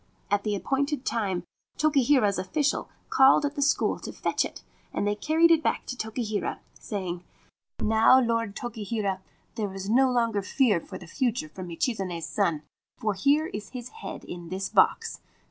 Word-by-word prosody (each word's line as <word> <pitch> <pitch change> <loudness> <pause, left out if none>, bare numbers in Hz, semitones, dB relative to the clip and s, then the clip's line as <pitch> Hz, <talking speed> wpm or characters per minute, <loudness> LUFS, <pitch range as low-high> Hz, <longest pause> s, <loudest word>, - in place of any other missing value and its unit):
At 205 0 +3
the 210 0 -1
appointed 280 +5 -1
time 195 -6 -1 0.3
Tokihira's 270 -9 +3
officials 280 +10 0 0.2
called 270 +2 +6
at 285 - -1
the 290 - -3
school 280 - +2
to - - -7
fetch - - 0
it, - - -7 0.3
and - - -1
they 205 - +2
carried 320 +10 +3
it 325 -1 +5
back - - 0
to 250 - -5
Tokihira, 220 -2 -3 0.2
saying: 180 -4 -5 0.6
c - - -1
Now, 220 +4 +6
Lord 230 -4 0
Tokihira, 215 -4 -3 0.3
there 210 -3 -3
is 195 +2 -4
no 260 +2 +5
longer 230 -4 +1
fear 210 -2 +2
for 185 +3 -9
the 180 - -11
future 255 - -1
from 185 -9 -8
Michizane's 175 -2 -2
son, 170 -8 0 0.3
for 215 -1 0
here 280 +11 +3
is 205 -1 -6
his 250 -2 -7
head 450 - -8
in 175 -1 -8
this 190 +2 -3
box. - - +2
220 Hz, 170 wpm, -27 LUFS, 195-265 Hz, 0.6 s, called